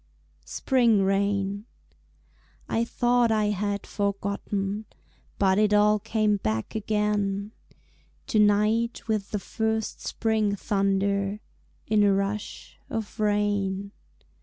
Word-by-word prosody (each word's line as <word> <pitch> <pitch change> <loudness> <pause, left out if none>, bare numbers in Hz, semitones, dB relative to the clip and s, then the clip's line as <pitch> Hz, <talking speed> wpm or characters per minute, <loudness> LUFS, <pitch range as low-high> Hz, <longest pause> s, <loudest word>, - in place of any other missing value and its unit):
Spring 235 -6 +2
Rain 200 +1 0 1.0
I 225 - 0
thought 240 0 +2
I 215 -1 +2
had 205 0 -2
forgotten, 200 0 -2 0.5
But 190 0 +3
it 210 -1 +3
all 210 0 +4
came 215 -1 +1
back 110 - -2
again 210 -1 -1 0.7
To 215 - +1
night 210 +3 +2
with 215 -3 -1
the 210 - -2
first 220 +2 -2
spring 220 -2 0
thunder 200 0 0 0.5
In 215 -1 +2
a 200 -1 +4
rush 200 +2 -4
of 220 0 -5
rain. 205 -2 0
205 Hz, 105 wpm, -26 LUFS, 200-215 Hz, 1.0 s, all